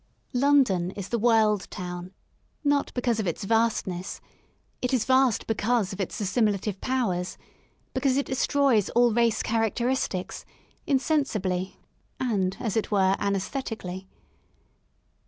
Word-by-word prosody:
London 250 -10 +3
is 195 0 -7
the 235 - 0
world 215 -3 +3
town, 180 -1 -6 0.5
not 285 -1 +1
because 240 -2 0
of 210 - -1
its 170 - -3
vast 225 +2 +2
ness; 180 0 -5 0.6
it 250 +1 +1
is 225 -4 0
vast 260 -3 +3
because 225 -1 0
of 190 - -4
its 195 - -4
assimilative 205 -1 0
powers, 205 -9 -1 0.6
because 260 0 +1
it 280 - +1
destroys 260 -4 +2
all 240 -1 +5
race 230 -1 +2
characteristics, 225 -3 -1 0.4
insensibly 225 - 0 0.4
and, 195 -7 0
as 225 -6 -2
it 220 - 0
were, 195 -2 +3
anaesthetically. 195 -2 -3
220 Hz, 120 wpm, -26 LUFS, 190-250 Hz, 0.6 s, all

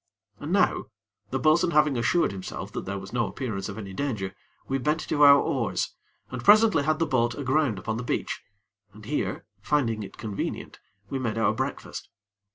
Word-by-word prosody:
And 150 - -5
now, 200 +1 +2 0.4
the 135 - -1
bo'sun 155 +6 +4
having 150 -2 +4
assured 135 +9 +2
himself 95 -1 -6
that - - -5
there 100 +1 -3
was 95 +1 -9
no 120 -2 +1
appearance 110 -7 -4
of 100 - -7
any 100 -3 -7
danger, 105 -6 -2 0.3
we 135 0 0
bent 150 +4 0
to 150 - -1
our 140 -1 +9
oars, - - -1 0.4
and - - -5
presently 210 -5 +6
had 155 +2 +1
the 165 - +1
boat 120 -5 +1
aground 140 -4 +1
upon 110 +4 -3
the 125 - -4
beach, - - -2 0.5
and 105 0 -13
here, 105 -7 -2 0.2
finding 115 -4 +1
it 100 - -9
convenient, 105 -3 -5 0.3
we 135 - -1
made 115 -4 -2
our 110 -1 +3
breakfast. - - -4
125 Hz, 180 wpm, -26 LUFS, 105-150 Hz, 0.5 s, our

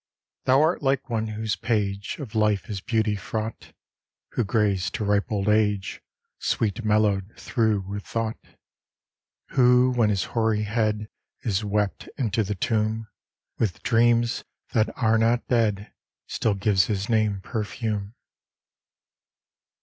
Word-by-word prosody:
Thou 130 +1 +5
art 160 +3 +1
like 135 -2 0
one 110 -1 0
whose 110 0 -2
page 100 -3 -1
Of 130 -8 -8
life 105 -2 +1
is 100 -2 -4
beauty 110 -1 +1
fraught, 110 +4 -5 0.6
Who 120 - 0
grays 100 -4 +1
to - - -4
ripe 100 +1 +1
old 100 -1 -1
age, 105 -2 +1 0.4
Sweet 110 +1 -1
mellowed 105 -2 +2
through 110 -4 +1
with 100 +1 -6
thought: 115 -1 -3 1.1
Who, 125 -1 +5
when 120 -4 +2
his 100 -3 +1
hoary 110 -2 +2
head 105 0 0 0.3
Is 110 -6 0
wept 105 -1 -1
into 115 -3 +1
the 105 +1 -3
tomb, 110 +2 -1 0.5
With 100 -8 -1
dreams, 120 0 +3 0.3
that 110 -1 +2
are 115 -2 +3
not 115 +2 +2
dead, 105 -4 +1 0.3
Still 110 -3 0
gives 95 -1 +3
his 100 -1 -2
name 110 -3 +1
perfume. 105 -1 -3
110 Hz, 130 wpm, -25 LUFS, 105-115 Hz, 1.1 s, Thou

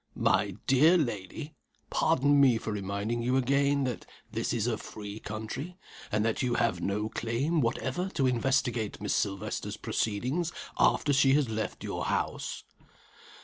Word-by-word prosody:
"My - - +2
dear 155 +7 +6
lady! 140 - -3 0.4
pardon 145 -2 +3
me 130 -4 +5
for 110 - -4
reminding 100 +3 -2
you 125 +2 +1
again, 140 +2 +2
that 125 -3 -3 0.2
this - - -1
is - - 0
a - - +1
free 105 0 -8
country, 110 - -6 0.3
and 105 +1 +1
that 115 - 0
you 125 -2 +1
have 115 - +1
no 105 +2 -1
claim 130 +9 0
whatever 130 +9 -1
to 135 - +2
investigate 125 -3 +1
Miss 105 - -1
Silvester's 100 -3 -2
proceedings 130 +11 -1 0.3
after 145 - +3
she 135 0 +5
has 145 -5 +2
left 110 0 -3
your - - -3
house." - - -2
125 Hz, 145 wpm, -29 LUFS, 110-140 Hz, 0.4 s, dear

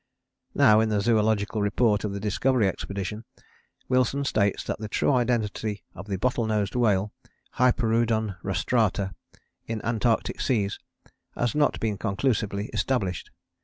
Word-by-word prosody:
Now 110 0 +6
in 110 0 +2
the 105 -1 +1
Zoological 110 0 +1
Report 105 +1 +2
of 105 - -2
the 100 - -4
Discovery 110 +2 +1
Expedition 100 +3 -4 0.6
Wilson 130 +2 +1
states 100 -6 +1
that - - -4
the 110 - -5
true 125 - +1
identity 110 -5 -1
of 95 +4 -10
the 100 - -2
Bottle 120 +3 0
nosed 105 -3 0
whale 105 -4 +2 0.5
(Hyperoodon 115 -5 +2
rostrata) 100 0 0 0.5
in 115 -1 -3
Antarctic 115 0 0
Seas 105 -6 0 0.6
has 120 -1 0
not 150 -1 +2
been 105 -3 -2
conclusively 105 -1 -1
established. 100 -9 -1
110 Hz, 130 wpm, -26 LUFS, 100-120 Hz, 0.6 s, Now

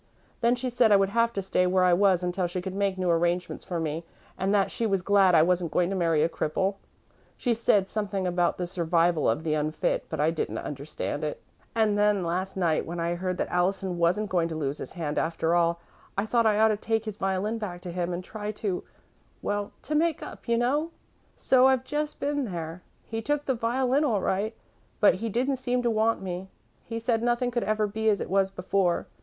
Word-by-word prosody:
Then 235 +1 +3
she 250 0 -3
said 235 -2 +4
I - - +8
would 195 -1 +3
have 230 +2 +2
to 195 - -2
stay 180 -1 +1
where 185 0 +3
I 180 -1 +5
was 185 -1 +3
until 180 0 0
she 175 +1 -4
could 185 +1 -5
make 195 -1 0
new 180 -2 +1
arrangements 175 +1 0
for 175 -3 -3
me 160 +1 -3 0.3
and 190 +1 -1
that 200 -2 +2
she 230 - -1
was 195 -3 0
glad 195 -3 +5
I 155 - +7
wasn't 175 0 +1
going 180 +1 +1
to - - -1
marry 165 -4 +2
a - - +4
cripple. 190 +4 -1 0.6
She 245 - +1
said 210 -4 +2
something 200 -2 -2
about 175 -1 +1
'the 180 - -2
survival 170 - +1
of 115 +8 0
the 155 -2 0
unfit,' 155 +1 -1
but - - -4
I 155 +2 +3
didn't 165 - -3
understand 145 +1 -5
it. 150 - -3 0.4
"And 215 -2 +2
then, 205 -2 +3
last 185 +3 -2
night, 165 -4 +1
when 170 +1 -4
I 170 +1 0
heard 185 +1 -2
that - - -2
Allison 180 0 0
wasn't 185 +5 +1
going 175 -3 +2
to 165 - -5
lose 145 -2 -2
his - - -7
hand 155 -4 -2
after 165 0 0
all, 170 0 +2 0.4
I 200 - +1
thought 230 0 +2
I 210 -1 +3
ought 220 +1 +5
to 215 - +1
take 225 +1 -1
his 215 -2 -5
violin 195 +4 -1
back 180 -5 -5
to 180 -1 -6
him 175 0 -2
and 175 +1 -4
try 210 +2 -5
to 195 -3 -3 0.6
well, 205 0 -2
to 305 - -4
make 320 0 +1
up, - - -10
you 235 0 +2
know. 285 +7 +1 0.5
So 260 0 +4
I've 260 -1 +3
just 295 +2 -3
been 285 -1 -1
there. 170 -3 -5 0.2
He 225 0 -4
took 290 +5 -1
the 265 - +1
violin 255 +4 +1
all 225 -9 +1
right, 210 +5 -1 0.4
but 210 - +6
he 230 - -1
didn't 260 +5 0
seem 250 -1 -1
to 235 - +2
want 220 -1 +1
me. 185 0 -5 0.3
He 230 - -5
said 230 0 0
nothing 240 +1 +1
could 240 -1 -1
ever 215 0 +1
be 220 +2 0
as 205 -2 +2
it - - -5
was 195 0 +3
before. 185 -1 0
195 Hz, 225 wpm, -27 LUFS, 175-225 Hz, 0.6 s, I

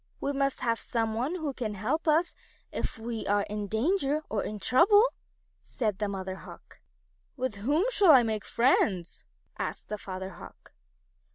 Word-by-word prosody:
We 280 - -1
must 275 -1 0
have 230 -1 0
some 225 -2 -1
one 255 +10 -1
who 310 -6 -3
can 220 -5 -4
help 265 - -2
us 320 +3 +3 0.4
if - - -3
ever 225 +1 -9
we 230 -2 -4
are 205 0 +2
in 210 0 -4
danger, 290 - +1
or 210 -2 0
in 210 - -4
trouble," 355 - +5 0.6
said 215 -6 -2
the 210 - 0
Mother 190 -1 -4
Hawk. - - -13 0.6
"With 255 -5 -2
whom 290 - +1
shall 405 -7 +4
I 265 -5 +9
make 220 -2 -2
friends?" 200 -8 +1 0.3
asked - - -4
the 210 - -4
Father 190 -1 -6
Hawk. 175 - -14
230 Hz, 170 wpm, -29 LUFS, 205-285 Hz, 0.6 s, I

